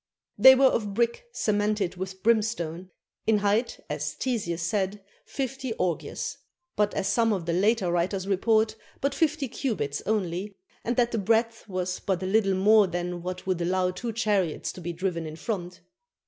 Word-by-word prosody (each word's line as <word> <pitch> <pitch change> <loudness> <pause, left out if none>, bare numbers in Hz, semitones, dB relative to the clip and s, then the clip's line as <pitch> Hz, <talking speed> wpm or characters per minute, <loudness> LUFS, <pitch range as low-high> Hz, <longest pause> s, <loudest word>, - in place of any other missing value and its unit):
They 265 0 +9
were 270 +1 +4
of 210 -6 +1
brick 235 - 0
cemented 210 - 0
with 190 +1 -6
brimstone; 205 -6 0 0.4
in 220 -1 +5
height, 205 +4 +1
as 150 0 -3
Ctesias 195 -9 -2
says, 195 +2 0 0.3
fifty 265 -2 -3
orgyas; 175 -6 -2 0.4
but 205 0 +1
as 190 - 0
some 230 +2 +2
of 190 -5 -1
the 170 - -1
later 195 0 +2
writers 185 +2 0
report, 220 +3 +2 0.2
but 280 0 0
fifty 300 -1 +1
cubits 215 - -2
only, 195 -1 -1 0.3
and 240 - -1
that 240 -1 +2
the 230 - 0
breadth 225 +2 +1
was 185 -1 -2
but 190 -2 -1
a - - -1
little 195 0 +2
more 210 +2 +5
than 175 0 -3
what 180 +1 -5
would 185 -2 -1
allow 180 +1 +1
two 235 +5 -4
chariots 205 -7 0
to 185 - -10
be 175 +1 -3
driven 170 -1 -2
in 155 - -7
front. 180 -1 -5
200 Hz, 170 wpm, -27 LUFS, 180-225 Hz, 0.4 s, They